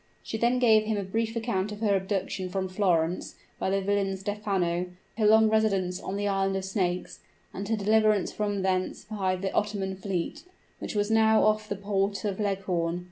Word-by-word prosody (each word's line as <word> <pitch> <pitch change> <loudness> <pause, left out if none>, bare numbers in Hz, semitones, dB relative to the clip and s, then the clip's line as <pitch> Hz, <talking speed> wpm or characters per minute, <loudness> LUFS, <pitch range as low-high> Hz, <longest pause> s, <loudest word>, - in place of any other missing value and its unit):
She - - -5
then 240 +2 +3
gave 220 -3 +5
him 215 -1 0
a 200 - -1
brief 225 +4 -2
account 220 -4 -1
of 210 +1 -8
her 205 -3 +3
abduction 190 -1 -2
from 190 0 -2
Florence 180 -3 0 0.2
by - - 0
the 195 +1 +1
villain 195 -1 0
Stephano 190 -3 -1 0.3
her 215 - +4
long 220 +1 +6
residence 195 -4 +1
on 190 - -4
the 205 0 -1
island 195 -1 +1
of 190 -1 -2
snakes 180 -2 -2 0.3
and 200 +2 -5
her 225 - +1
deliverance 215 -1 +3
from 205 -2 -2
thence 185 -1 -1
by 190 -3 -1
the 190 +1 -3
Ottoman 200 -2 -1
fleet, 190 - -3 0.4
which - - -5
was 205 +1 +1
now 220 0 +5
off 215 0 +2
the 200 - -1
port 200 0 -1
of 200 -1 -2
Leghorn. 185 -4 -1
200 Hz, 190 wpm, -27 LUFS, 190-215 Hz, 0.4 s, long